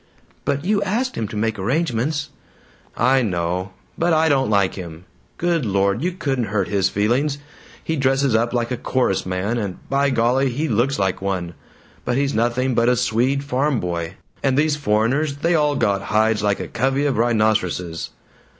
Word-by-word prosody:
"But 140 Hz, +3 st, -1 dB
you 205 Hz, +1 st, +2 dB
asked 230 Hz, +6 st, -1 dB
him 110 Hz, -, -2 dB
to 105 Hz, -, -6 dB
make 110 Hz, 0 st, -1 dB
arrangements." 145 Hz, -, -1 dB, 0.7 s
"I 135 Hz, +1 st, +3 dB
know, 90 Hz, -2 st, -2 dB, 0.3 s
but 170 Hz, 0 st, +2 dB
I 160 Hz, 0 st, +3 dB
don't 135 Hz, -4 st, +2 dB
like 100 Hz, -3 st, +2 dB
him. 85 Hz, -2 st, -9 dB, 0.3 s
Good 170 Hz, -3 st, 0 dB
Lord, 100 Hz, +1 st, +1 dB
you 180 Hz, +3 st, 0 dB
couldn't 135 Hz, -9 st, -1 dB
hurt 100 Hz, -1 st, -1 dB
his 95 Hz, -2 st, +2 dB
feelings! 125 Hz, +8 st, +1 dB, 0.5 s
He 160 Hz, -, -2 dB
dresses 135 Hz, -1 st, +2 dB
up 115 Hz, +2 st, +2 dB
like 120 Hz, 0 st, -1 dB
a 125 Hz, -, -1 dB
chorus 125 Hz, -7 st, 0 dB
man 95 Hz, +6 st, -1 dB
and, 100 Hz, -4 st, -4 dB
by 140 Hz, +1 st, +2 dB
golly, 130 Hz, +2 st, +2 dB
he 145 Hz, +6 st, -2 dB
looks 125 Hz, +3 st, +1 dB
like 95 Hz, -1 st, -1 dB
one! 90 Hz, -3 st, -2 dB, 0.5 s
but 125 Hz, -, -1 dB
he's 140 Hz, 0 st, 0 dB
nothing 120 Hz, +3 st, +1 dB
but 115 Hz, +1 st, +3 dB
a 125 Hz, -, +3 dB
Swede 125 Hz, +3 st, +1 dB
farm 140 Hz, -1 st, 0 dB
boy, 85 Hz, 0 st, -3 dB, 0.3 s
and 135 Hz, -1 st, +1 dB
these 150 Hz, 0 st, +3 dB
foreigners, 140 Hz, +3 st, +1 dB
they 170 Hz, +4 st, +1 dB
all 150 Hz, -3 st, +2 dB
got 100 Hz, -6 st, +1 dB
hides 110 Hz, +2 st, +1 dB
like 105 Hz, -1 st, +1 dB
a -, -, -4 dB
covey 135 Hz, +4 st, 0 dB
of 140 Hz, -5 st, 0 dB
rhinoceroses 110 Hz, -7 st, 0 dB
120 Hz, 175 wpm, -21 LUFS, 100-140 Hz, 0.7 s, I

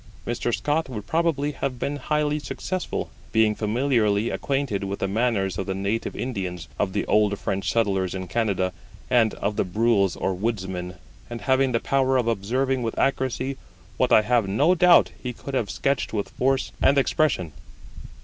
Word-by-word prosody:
Mr. 120 Hz, 0 st, -1 dB
Scott 150 Hz, +4 st, 0 dB
would 105 Hz, -5 st, -6 dB
probably 160 Hz, -3 st, 0 dB
have 135 Hz, -2 st, -3 dB
been 145 Hz, +4 st, -2 dB
highly 150 Hz, +1 st, 0 dB
successful, 185 Hz, +4 st, -4 dB, 0.2 s
being 110 Hz, -1 st, +3 dB
familiarly 110 Hz, -1 st, +1 dB
acquainted 135 Hz, -8 st, -1 dB
with 100 Hz, 0 st, -3 dB
the 95 Hz, -, -1 dB
manners 100 Hz, -4 st, 0 dB
of 95 Hz, -, -3 dB
the 95 Hz, -, -2 dB
native 100 Hz, +4 st, -2 dB
Indians, 90 Hz, -9 st, -4 dB
of 95 Hz, -2 st, 0 dB
the 100 Hz, -, -1 dB
old 105 Hz, -1 st, +2 dB
French 95 Hz, 0 st, -2 dB
settlers 95 Hz, -5 st, 0 dB
in 95 Hz, 0 st, -4 dB
Canada, 100 Hz, -5 st, 0 dB, 0.4 s
and 115 Hz, -3 st, +3 dB
of 105 Hz, +1 st, -2 dB
the -, -, +3 dB
Brules 100 Hz, 0 st, +2 dB
or 95 Hz, -, -1 dB
Woodsmen, 95 Hz, -3 st, -3 dB, 0.3 s
and 120 Hz, -1 st, -6 dB
having 130 Hz, 0 st, +2 dB
the 115 Hz, -, +1 dB
power 135 Hz, 0 st, +2 dB
of 120 Hz, -2 st, 0 dB
observing 125 Hz, +5 st, 0 dB
with 115 Hz, -2 st, -3 dB
accuracy 130 Hz, 0 st, 0 dB, 0.4 s
what -, -, +2 dB
I 110 Hz, -, +6 dB
have 120 Hz, -2 st, +2 dB
no 145 Hz, -, +3 dB
doubt 180 Hz, -1 st, +5 dB
he 125 Hz, -1 st, -4 dB
could 140 Hz, +3 st, -8 dB
have 115 Hz, -6 st, 0 dB
sketched 135 Hz, -6 st, -1 dB
with 105 Hz, -2 st, -2 dB
force 135 Hz, +1 st, 0 dB
and 140 Hz, -, +4 dB
expression. 135 Hz, -, +1 dB
115 Hz, 170 wpm, -24 LUFS, 100-135 Hz, 0.4 s, I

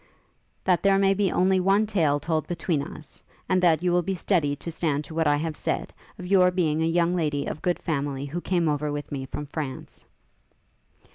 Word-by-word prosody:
'That 180 Hz, -3 st, +2 dB
there 195 Hz, 0 st, +4 dB
may 195 Hz, 0 st, +4 dB
be 195 Hz, -1 st, +1 dB
only 185 Hz, +1 st, +3 dB
one 195 Hz, +3 st, +3 dB
tale 160 Hz, -9 st, +1 dB
told 160 Hz, +1 st, -1 dB
between 170 Hz, -3 st, -1 dB
us, 150 Hz, +1 st, -10 dB, 0.2 s
and 185 Hz, -1 st, +2 dB
that 170 Hz, -2 st, +3 dB
you 180 Hz, -, +2 dB
will 175 Hz, 0 st, +3 dB
be 190 Hz, +3 st, -2 dB
steady 160 Hz, -6 st, +1 dB
to 170 Hz, +4 st, -7 dB
stand 150 Hz, -3 st, -1 dB
to 150 Hz, -, -11 dB
what 160 Hz, -1 st, +1 dB
I 145 Hz, -, +4 dB
have 155 Hz, +1 st, -3 dB
said, -, -, -3 dB, 0.2 s
of 180 Hz, -, -8 dB
your 180 Hz, -1 st, +5 dB
being 160 Hz, -4 st, 0 dB
a 160 Hz, -, +2 dB
young 170 Hz, +1 st, +2 dB
lady 150 Hz, -4 st, -1 dB
of 155 Hz, -, -5 dB
good 175 Hz, +1 st, 0 dB
family, 140 Hz, -3 st, -3 dB
who 165 Hz, +5 st, -4 dB
came 175 Hz, -3 st, 0 dB
over 150 Hz, 0 st, 0 dB
with 145 Hz, 0 st, -5 dB
me 135 Hz, -2 st, -4 dB
from 150 Hz, +2 st, -5 dB
France.' 145 Hz, -2 st, -7 dB
165 Hz, 210 wpm, -25 LUFS, 145-180 Hz, 0.2 s, your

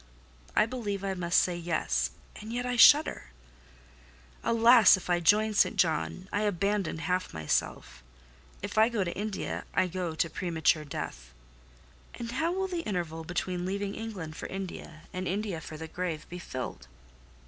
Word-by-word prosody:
I -, -, +5 dB
believe 210 Hz, -5 st, -4 dB
I 195 Hz, -1 st, -1 dB
must 180 Hz, -1 st, 0 dB
say, 180 Hz, -, +1 dB
Yes—and 165 Hz, -, -3 dB
yet 245 Hz, +1 st, -2 dB
I 250 Hz, 0 st, -1 dB
shudder. 290 Hz, -, +6 dB, 1.2 s
Alas! 230 Hz, -3 st, +7 dB
If 180 Hz, -1 st, -5 dB
I 175 Hz, -, +3 dB
join 210 Hz, +5 st, +3 dB
St. 200 Hz, -, +3 dB
John, 80 Hz, -, 0 dB
I 205 Hz, -, +1 dB
abandon 200 Hz, -3 st, 0 dB
half 180 Hz, -, -2 dB
myself: 80 Hz, -5 st, -2 dB, 0.6 s
if -, -, -1 dB
I 220 Hz, +2 st, +6 dB
go 225 Hz, -5 st, 0 dB
to 170 Hz, -, -4 dB
India, 210 Hz, 0 st, -3 dB
I -, -, +4 dB
go 180 Hz, -2 st, -3 dB
to 165 Hz, -, +1 dB
premature 160 Hz, -2 st, 0 dB
death. -, -, -7 dB, 0.8 s
And 235 Hz, -1 st, -6 dB
how 315 Hz, +7 st, 0 dB
will 380 Hz, +1 st, -1 dB
the 355 Hz, -2 st, -3 dB
interval 170 Hz, -, -3 dB
between 180 Hz, +1 st, -3 dB
leaving 200 Hz, +2 st, -2 dB
England 195 Hz, -9 st, -6 dB
for -, -, -6 dB
India, 180 Hz, -4 st, -7 dB
and 185 Hz, 0 st, -3 dB
India 195 Hz, -3 st, -2 dB
for 155 Hz, -, -8 dB
the 160 Hz, +1 st, -6 dB
grave, 165 Hz, -2 st, -4 dB
be 180 Hz, -, -7 dB
filled? 125 Hz, -, -6 dB
185 Hz, 160 wpm, -29 LUFS, 165-215 Hz, 1.2 s, Alas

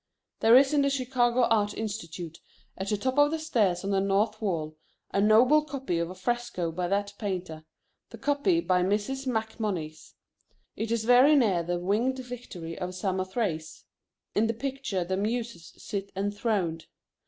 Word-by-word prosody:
There 225 Hz, +2 st, +7 dB
is 270 Hz, +2 st, +4 dB
in 290 Hz, -, +4 dB
the 280 Hz, -, +2 dB
Chicago 255 Hz, -2 st, +1 dB
Art 210 Hz, -3 st, +2 dB
Institute 175 Hz, -6 st, -5 dB, 0.4 s
at 190 Hz, +1 st, -4 dB
the 210 Hz, -, +1 dB
top 260 Hz, +6 st, 0 dB
of 290 Hz, 0 st, +6 dB
the 320 Hz, -, -1 dB
stairs 215 Hz, -, +1 dB
on 200 Hz, -, -2 dB
the 195 Hz, -, +2 dB
north 210 Hz, +3 st, +1 dB
wall 160 Hz, -7 st, -2 dB, 0.4 s
a 200 Hz, -, +1 dB
noble 245 Hz, +9 st, +5 dB
copy 270 Hz, -, -3 dB
of 170 Hz, 0 st, -2 dB
a 185 Hz, -, -8 dB
fresco 235 Hz, -4 st, -2 dB
by 175 Hz, +2 st, -2 dB
that 200 Hz, +2 st, -1 dB
painter, 180 Hz, -6 st, -4 dB, 0.4 s
the -, -, -10 dB
copy 290 Hz, +4 st, +1 dB
by 180 Hz, -, +2 dB
Mrs. 210 Hz, +8 st, -1 dB
MacMonnies. 215 Hz, -9 st, -3 dB, 0.6 s
It 225 Hz, +1 st, -3 dB
is 230 Hz, -1 st, 0 dB
very 250 Hz, +5 st, +6 dB
near 210 Hz, -11 st, +3 dB
the 175 Hz, +1 st, -2 dB
Winged 215 Hz, +9 st, 0 dB
Victory 245 Hz, -10 st, -7 dB
of 180 Hz, 0 st, -4 dB
Samothrace. 185 Hz, -3 st, -2 dB, 0.5 s
In 220 Hz, +2 st, +2 dB
the 225 Hz, -, -1 dB
picture 260 Hz, -6 st, -3 dB
the 185 Hz, +2 st, -2 dB
muses 225 Hz, -3 st, -3 dB
sit 200 Hz, -1 st, -5 dB
enthroned. 200 Hz, -4 st, -1 dB
210 Hz, 165 wpm, -28 LUFS, 185-245 Hz, 0.6 s, There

